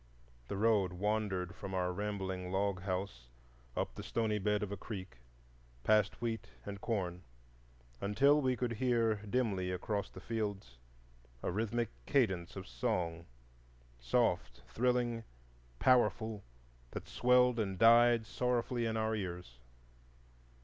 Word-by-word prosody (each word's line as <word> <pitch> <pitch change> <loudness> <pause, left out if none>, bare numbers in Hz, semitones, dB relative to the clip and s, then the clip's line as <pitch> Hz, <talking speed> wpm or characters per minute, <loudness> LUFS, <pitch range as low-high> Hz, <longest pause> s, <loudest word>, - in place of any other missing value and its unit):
The 100 - -3
road 105 -4 +3
wandered 95 -2 -1
from 95 +2 -6
our 90 -1 0
rambling 95 -2 -3
log 95 -1 0
house 95 -10 -3 0.5
up - - -1
the - - -7
stony 110 -2 0
bed 105 +1 +1
of 100 - -4
a - - -2
creek, 95 - -7 0.7
past 105 -2 +3
wheat 115 -2 -3 0.2
and 100 -1 -6
corn, 90 -6 -2 0.8
until 140 +9 +4
we 130 -2 +2
could 120 -1 -1
hear 115 -2 +2
dimly 105 -3 -1
across 100 +3 -2
the - - -11
fields 100 - -4 0.6
a - - 0
rhythmic 115 +3 -1 0.2
cadence 95 -11 +1
of 95 -1 -7
song,—soft, - - -2
thrilling, 120 -1 +1 0.5
powerful, 110 - +3 0.5
that - - -7
swelled 125 0 +4
and 95 -3 -1
died 115 +1 +6
sorrowfully 120 0 0
in 110 0 -1
our 110 0 0
ears. 90 - -5
105 Hz, 120 wpm, -34 LUFS, 90-115 Hz, 0.8 s, died